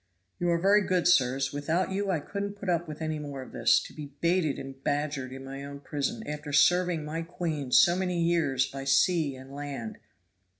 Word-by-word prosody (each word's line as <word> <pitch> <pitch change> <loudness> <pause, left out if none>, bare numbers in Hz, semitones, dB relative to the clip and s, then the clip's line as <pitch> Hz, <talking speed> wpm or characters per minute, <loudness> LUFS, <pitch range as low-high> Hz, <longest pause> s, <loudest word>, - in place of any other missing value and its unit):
"You 175 - +1
are 170 - +3
very 200 +4 +4
good, 185 -3 +1
sirs. 135 -4 +3
Without 160 +6 0
you 200 +1 -1
I 175 -4 +1
couldn't 200 +6 -5
put 200 -2 -2
up 175 0 0
with 155 +1 -6
any 155 -1 -2
more 140 -3 -6
of - - -13
this - - +4
to - - -10
be 145 -2 -9
baited 170 -4 +1
and 135 0 -9
badgered 145 -3 -1
in 135 0 -8
my 135 +1 -7
own 140 0 -8
prison, 150 +11 -3
after 150 0 -5
serving 175 +1 +3
my 160 +2 -3
queen 165 -5 -4
so 175 +6 +6
many 180 -2 -1
years 165 -6 +2
by 135 0 -7
sea 140 +2 +2
and 130 +1 -12
land." 140 -6 -6
150 Hz, 205 wpm, -28 LUFS, 140-175 Hz, -, so